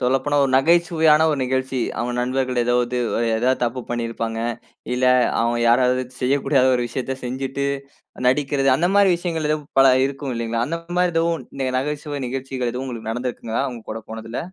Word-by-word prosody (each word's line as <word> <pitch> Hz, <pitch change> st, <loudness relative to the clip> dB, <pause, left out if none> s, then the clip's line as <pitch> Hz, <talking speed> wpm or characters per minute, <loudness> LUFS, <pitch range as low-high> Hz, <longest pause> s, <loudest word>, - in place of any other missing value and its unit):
சொல்லப்போனா, 135 Hz, +3 st, +1 dB
ஒரு 135 Hz, -, 0 dB
நகைச்சுவையான 160 Hz, 0 st, +4 dB
1 145 Hz, -, -1 dB
நிகழ்ச்சி, 130 Hz, 0 st, -1 dB, 0.2 s
அவுங்க 120 Hz, +1 st, -2 dB
நண்பர்கள் 130 Hz, 0 st, 0 dB
ஏதாவது 120 Hz, 0 st, +1 dB, 0.4 s
ஏதாவது 130 Hz, +3 st, +1 dB
தப்பு 120 Hz, +2 st, -2 dB
பண்ணியிருப்பாங்க. 115 Hz, -1 st, -3 dB, 0.6 s
இல்ல, 125 Hz, +1 st, 0 dB, 0.4 s
அவுங்க 120 Hz, +1 st, +1 dB
யாராவது 125 Hz, +1 st, +3 dB, 0.2 s
செய்யக்கூடாத 135 Hz, 0 st, +2 dB
ஒரு 125 Hz, -, -1 dB
விஷயத்த 130 Hz, +2 st, -4 dB
செஞ்சுட்டு 135 Hz, +2 st, -3 dB, 0.6 s
நடிக்கிறது, 135 Hz, +1 st, +1 dB
அந்த 175 Hz, +5 st, +1 dB
மாரி 200 Hz, -2 st, +5 dB
விஷயங்கள், 165 Hz, -3 st, -2 dB
எதும் 150 Hz, -1 st, -2 dB
பல 135 Hz, -1 st, +7 dB
இருக்கும் 135 Hz, -1 st, -5 dB
இல்லைங்களா? 115 Hz, 0 st, -1 dB
அந்த 165 Hz, +4 st, -3 dB, 0.2 s
மாரி 180 Hz, -1 st, +2 dB
எதோ 165 Hz, 0 st, +2 dB
1, 135 Hz, -4 st, -5 dB
நகைச்சுவை 145 Hz, +1 st, -4 dB
நிகழ்ச்சிகள் 130 Hz, -1 st, -3 dB
எதுவும் 130 Hz, +2 st, -4 dB
உங்களுக்கு 115 Hz, -3 st, -5 dB
நடந்திருக்குங்களா? 120 Hz, 0 st, -3 dB
அவுங்க 120 Hz, -4 st, -7 dB
கூட 110 Hz, -, -6 dB
போனதில? 115 Hz, +1 st, -6 dB
130 Hz, 155 wpm, -21 LUFS, 120-145 Hz, 0.6 s, பல